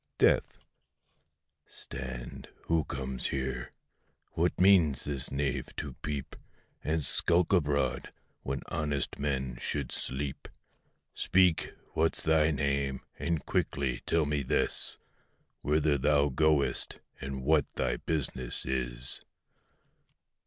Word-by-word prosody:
DEATH. -, -, +3 dB, 1.0 s
Stand, 65 Hz, -2 st, -7 dB
who 80 Hz, -3 st, +1 dB
comes 65 Hz, -2 st, -2 dB
here? 65 Hz, -2 st, -3 dB, 0.6 s
what 85 Hz, +2 st, 0 dB
means 90 Hz, -7 st, +5 dB
this 70 Hz, -3 st, -2 dB
knave 70 Hz, -1 st, -2 dB
to 70 Hz, -3 st, -4 dB
peep 75 Hz, -3 st, -4 dB, 0.5 s
And 80 Hz, 0 st, 0 dB
skulk 85 Hz, +6 st, +2 dB
abroad, 70 Hz, -7 st, +1 dB, 0.3 s
when 70 Hz, +1 st, -3 dB
honest 75 Hz, -3 st, -1 dB
men 65 Hz, -3 st, -1 dB
should 70 Hz, -4 st, -2 dB
sleep? 70 Hz, +1 st, -3 dB, 0.7 s
Speak, 90 Hz, -3 st, +3 dB, 0.2 s
what's 80 Hz, +1 st, +2 dB
thy 80 Hz, -1 st, +4 dB
name? 70 Hz, -2 st, 0 dB, 0.2 s
and 85 Hz, -4 st, -1 dB
quickly 65 Hz, -3 st, 0 dB
tell 80 Hz, -2 st, +3 dB
me 75 Hz, 0 st, 0 dB
this, 65 Hz, -, 0 dB, 0.6 s
Whither 75 Hz, -1 st, +2 dB
thou 70 Hz, +1 st, +4 dB
goest, 75 Hz, +1 st, +1 dB, 0.2 s
and 65 Hz, -1 st, -5 dB
what 75 Hz, +1 st, +3 dB
thy 60 Hz, -2 st, 0 dB
business 65 Hz, -6 st, -2 dB
is? 60 Hz, -1 st, -2 dB
70 Hz, 105 wpm, -31 LUFS, 65-75 Hz, 1.0 s, means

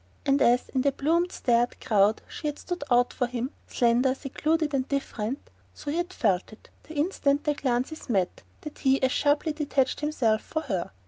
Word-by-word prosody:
And 275 Hz, +1 st, +3 dB
as, 245 Hz, +1 st, +3 dB
in 260 Hz, -, 0 dB
the 280 Hz, +1 st, +3 dB
plumed 335 Hz, +6 st, +1 dB
starred 240 Hz, -1 st, +1 dB
crowd, 210 Hz, -3 st, +2 dB
she 305 Hz, -, -5 dB
had 295 Hz, 0 st, -3 dB
stood 355 Hz, -4 st, -5 dB
out 245 Hz, 0 st, +3 dB
for 250 Hz, -, 0 dB
him, 250 Hz, +2 st, -3 dB, 0.2 s
slender, 245 Hz, +2 st, +2 dB
secluded 305 Hz, +3 st, -1 dB
and 265 Hz, -1 st, 0 dB
different, 265 Hz, -3 st, -3 dB, 0.2 s
so 290 Hz, -, -5 dB
he 315 Hz, -, -1 dB
had 350 Hz, +1 st, -1 dB
felt, 195 Hz, -, 0 dB, 0.3 s
the 315 Hz, -, -12 dB
instant 290 Hz, -2 st, +1 dB
their 295 Hz, -, +1 dB
glances 265 Hz, +2 st, -2 dB
met, 190 Hz, -6 st, 0 dB, 0.2 s
that 300 Hz, -, -9 dB
he 270 Hz, 0 st, +3 dB
as 260 Hz, -, +3 dB
sharply 295 Hz, +3 st, +2 dB
detached 285 Hz, -3 st, 0 dB
himself 250 Hz, -8 st, +1 dB
for 315 Hz, -, -3 dB
her. 195 Hz, -, -2 dB
275 Hz, 185 wpm, -27 LUFS, 240-300 Hz, 0.3 s, And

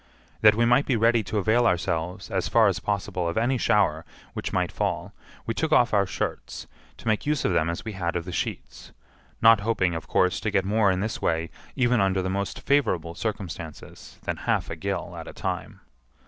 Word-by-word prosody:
That 105 Hz, -1 st, +7 dB
we 115 Hz, +1 st, +3 dB
might 125 Hz, +4 st, +3 dB
be 130 Hz, -, +2 dB
ready 115 Hz, +1 st, +3 dB
to 105 Hz, +4 st, -3 dB
avail 115 Hz, +4 st, +3 dB
ourselves, 90 Hz, +1 st, -2 dB
as -, -, 0 dB
far -, -, +5 dB
as -, -, 0 dB
possible, 100 Hz, -3 st, -2 dB
of 85 Hz, -, -3 dB
any 120 Hz, +3 st, +1 dB
shower 100 Hz, -10 st, +2 dB, 0.3 s
which -, -, -4 dB
might -, -, 0 dB
fall -, -, -2 dB, 0.3 s
we 115 Hz, -, -2 dB
took 160 Hz, +6 st, -2 dB
off 120 Hz, -7 st, +4 dB
our 100 Hz, -2 st, +3 dB
shirts, 80 Hz, -, -4 dB, 0.3 s
to -, -, -10 dB
make 110 Hz, +5 st, 0 dB
use 150 Hz, -2 st, 0 dB
of 95 Hz, -, +2 dB
them 85 Hz, -1 st, +2 dB
as 85 Hz, -, -4 dB
we 110 Hz, -, -4 dB
had 90 Hz, -4 st, -3 dB
of 85 Hz, -1 st, -2 dB
the 90 Hz, -, -6 dB
sheets—not 105 Hz, -, -1 dB
hoping, 100 Hz, -4 st, 0 dB
of 80 Hz, -2 st, -5 dB
course, 90 Hz, -3 st, +2 dB
to 110 Hz, -, -2 dB
get 95 Hz, -2 st, +1 dB
more 105 Hz, 0 st, +3 dB
in 95 Hz, 0 st, 0 dB
this 110 Hz, +2 st, -3 dB
way, 80 Hz, 0 st, 0 dB, 0.2 s
even 125 Hz, -3 st, +2 dB
under 95 Hz, -1 st, +1 dB
the 95 Hz, -, -2 dB
most 100 Hz, 0 st, -3 dB
favorable 95 Hz, -, +1 dB
circumstances, 85 Hz, -6 st, -6 dB
than -, -, -3 dB
half -, -, -1 dB
a -, -, -3 dB
gill -, -, -4 dB
at -, -, -8 dB
a -, -, -8 dB
time. -, -, -5 dB
100 Hz, 205 wpm, -25 LUFS, 85-115 Hz, 0.3 s, That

